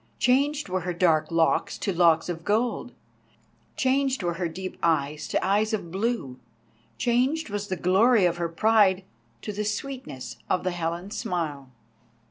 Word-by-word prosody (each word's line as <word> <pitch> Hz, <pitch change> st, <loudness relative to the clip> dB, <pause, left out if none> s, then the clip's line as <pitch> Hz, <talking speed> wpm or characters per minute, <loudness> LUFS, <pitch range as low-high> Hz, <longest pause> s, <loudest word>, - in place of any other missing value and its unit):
Changed 280 Hz, +3 st, +2 dB
were 185 Hz, 0 st, -1 dB
her 180 Hz, 0 st, -4 dB
dark 165 Hz, -3 st, +2 dB
locks 165 Hz, -1 st, +1 dB
to 195 Hz, -, -2 dB
locks 165 Hz, -2 st, +4 dB
of 165 Hz, -2 st, -5 dB
gold, 230 Hz, +4 st, 0 dB, 0.9 s
changed 265 Hz, -3 st, +1 dB
were 175 Hz, -1 st, 0 dB
her 175 Hz, +1 st, -2 dB
deep 185 Hz, +3 st, -6 dB
eyes 150 Hz, -2 st, 0 dB
to -, -, -1 dB
eyes 210 Hz, +3 st, +1 dB
of 175 Hz, -6 st, -3 dB
blue, 190 Hz, -, -2 dB, 0.6 s
changed 255 Hz, +3 st, +1 dB
was 205 Hz, 0 st, -3 dB
the 185 Hz, -, -2 dB
glory 195 Hz, +5 st, +4 dB
of 175 Hz, -1 st, +1 dB
her 170 Hz, -1 st, -2 dB
pride 195 Hz, +1 st, +3 dB, 0.4 s
to 210 Hz, -, -4 dB
the 210 Hz, +1 st, -2 dB
sweetness 215 Hz, -, -5 dB
of 185 Hz, -, +1 dB
the 185 Hz, -, 0 dB
Helen's 175 Hz, +3 st, -4 dB
smile. 155 Hz, -, -3 dB
190 Hz, 155 wpm, -26 LUFS, 170-225 Hz, 0.9 s, locks